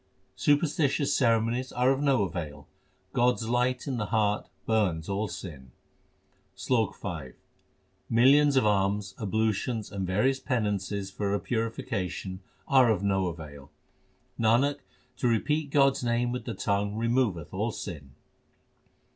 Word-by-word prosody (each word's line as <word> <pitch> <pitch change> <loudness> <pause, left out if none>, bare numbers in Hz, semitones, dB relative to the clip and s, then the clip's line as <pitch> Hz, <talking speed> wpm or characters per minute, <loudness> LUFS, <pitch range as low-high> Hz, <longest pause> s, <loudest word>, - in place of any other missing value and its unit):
Superstitious 145 -1 +2
ceremonies 115 +1 +1
are 125 +2 +2
of 135 +1 0
no 135 -6 +3
avail; 85 -6 -5 0.5
God 125 +1 +3
s - - -6
light 125 +2 0
in 135 -3 -2
the 105 -3 -2
heart 105 -1 0 0.2
burns 95 -8 +1
all 100 +2 -1
sin: 65 -12 -9 0.8
SLOK 115 -5 0
V 75 -8 -6 0.8
Millions 140 +5 +5
of 130 - +4
alms, 100 -1 +1
ablutions, 110 +1 -1
and 95 -2 -3
various 130 +9 +1
penances 105 -6 -2
for 100 0 -1
purification 100 -3 -3 0.3
are 130 -3 +5
of 100 -3 +1
no 95 -2 +1
avail. 75 -4 -8 0.7
Nanak, 120 +6 +3 0.4
to 125 - 0
repeat 145 +6 +1
God 140 -1 +5
s 135 -1 -6
name 120 0 +1
with 125 -2 -4
the 115 - -4
tongue 100 0 -1
removeth 115 - 0
all 105 +5 -1
sin. 75 -11 -8
110 Hz, 130 wpm, -28 LUFS, 95-125 Hz, 0.8 s, Millions